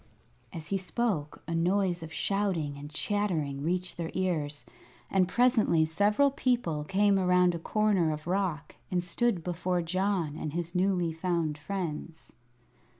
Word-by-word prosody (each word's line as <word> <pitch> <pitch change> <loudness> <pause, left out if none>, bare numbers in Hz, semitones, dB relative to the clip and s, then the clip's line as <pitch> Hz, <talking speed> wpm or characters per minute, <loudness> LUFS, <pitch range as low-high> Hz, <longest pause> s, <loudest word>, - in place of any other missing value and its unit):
As 160 -2 -8
he 195 - 0
spoke 185 -6 -2
a 165 - -2
noise 180 +1 +1
of 160 0 -8
shouting 185 -6 -1
and 145 +1 -8
chattering 155 -5 -1
reached 180 +4 -1
their 165 -1 -3
ears, 155 -6 -1 0.5
and 190 -2 +3
presently 220 -7 +3
several 205 - +3
people 240 - 0
came 195 +3 +3
around 180 -1 +4
a 170 - -4
corner 200 -3 +2
of 150 0 -5
rock 175 -4 -2
and 180 -1 0
stood 185 0 0
before 180 0 -1
John 180 -3 -1
and 150 -2 -4
his 170 0 -3
newly 180 -3 +1
found 165 -2 -1
friends. 165 -1 -5
180 Hz, 145 wpm, -29 LUFS, 160-195 Hz, 0.5 s, around